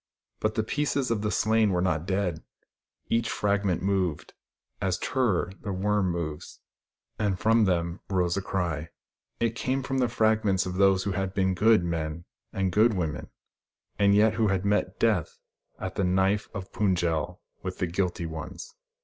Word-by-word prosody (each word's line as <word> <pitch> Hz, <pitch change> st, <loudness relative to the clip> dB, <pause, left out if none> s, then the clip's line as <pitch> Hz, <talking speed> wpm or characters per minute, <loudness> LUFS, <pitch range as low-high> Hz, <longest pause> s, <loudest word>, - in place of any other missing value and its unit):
But 110 Hz, 0 st, -1 dB
the 110 Hz, -, +1 dB
pieces 140 Hz, 0 st, -1 dB
of 110 Hz, -3 st, 0 dB
the 105 Hz, -, 0 dB
slain 110 Hz, 0 st, +2 dB
were 90 Hz, -2 st, +1 dB
not 90 Hz, -2 st, 0 dB
dead. 95 Hz, -4 st, -1 dB, 0.7 s
Each 115 Hz, -1 st, +1 dB
fragment 100 Hz, -4 st, 0 dB
moved, 95 Hz, -5 st, -1 dB, 0.5 s
as 95 Hz, -2 st, 0 dB
Tur 120 Hz, -4 st, +1 dB
ror, 95 Hz, -, -15 dB
the 100 Hz, -, -4 dB
worm, 100 Hz, 0 st, +1 dB
moves; 85 Hz, -4 st, -5 dB, 0.6 s
and 100 Hz, -3 st, +1 dB
from 115 Hz, +2 st, +4 dB
them 85 Hz, -1 st, 0 dB
rose 90 Hz, -3 st, +1 dB
a 100 Hz, -, -1 dB
cry. 85 Hz, -5 st, -2 dB, 0.5 s
It 115 Hz, -1 st, +1 dB
came 130 Hz, +2 st, -1 dB
from 135 Hz, +1 st, -1 dB
the 125 Hz, -2 st, +2 dB
fragments 110 Hz, -4 st, +2 dB
of 90 Hz, -, -3 dB
those 95 Hz, -1 st, +4 dB
who 100 Hz, -, -1 dB
had 95 Hz, 0 st, -2 dB
been 95 Hz, -1 st, +2 dB
good 105 Hz, +1 st, +4 dB
men 85 Hz, -1 st, -3 dB, 0.3 s
and 95 Hz, -1 st, -1 dB
good 110 Hz, +4 st, +4 dB
women, 80 Hz, -5 st, -3 dB, 0.7 s
yet 105 Hz, +2 st, +5 dB
who 110 Hz, -1 st, +1 dB
had 95 Hz, -1 st, 0 dB
met 105 Hz, +1 st, 0 dB
Death 105 Hz, -9 st, +1 dB, 0.4 s
at 95 Hz, -, -5 dB
the 100 Hz, -, -1 dB
knife 95 Hz, +3 st, +1 dB
of 95 Hz, -3 st, -7 dB
Pund 95 Hz, -4 st, +2 dB
jel 80 Hz, -3 st, -1 dB, 0.2 s
with -, -, -5 dB
the -, -, 0 dB
guilty 90 Hz, 0 st, -1 dB
ones. 80 Hz, -, -7 dB
95 Hz, 170 wpm, -27 LUFS, 90-110 Hz, 0.7 s, yet